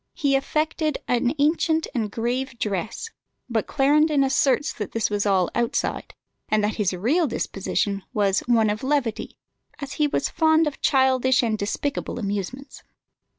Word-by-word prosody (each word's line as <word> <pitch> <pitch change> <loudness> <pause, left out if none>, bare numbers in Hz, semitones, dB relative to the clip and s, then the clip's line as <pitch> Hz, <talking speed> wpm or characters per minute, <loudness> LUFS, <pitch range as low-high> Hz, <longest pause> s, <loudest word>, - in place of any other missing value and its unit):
He 280 -2 +1
affected 305 +2 0
an 245 +3 +1
ancient 320 +2 +2
and 225 -5 -1
grave 240 +3 -3
dress; 210 - -3 0.4
but 225 -3 -1
Clarendon 295 +1 +3
asserts 270 +1 +2
that 210 -4 -6
this 225 -2 0
was 205 0 0
all 190 -3 +2
outside, 235 -1 -2 0.3
and 215 -1 +2
that 210 +1 -1
his 205 -4 +1
real 255 - +1
disposition 200 -3 -2
was 200 -2 +2
"one 225 -3 +3
of 210 - -4
levity," 265 -5 -1 0.4
as 280 -2 -6
he 300 - +4
was - - -1
fond 320 0 +3
of 295 -2 -4
childish 260 -2 +3
and 225 -2 +1
despicable 215 +9 -3
amusements. 205 +5 -5
250 Hz, 150 wpm, -24 LUFS, 210-290 Hz, 0.4 s, he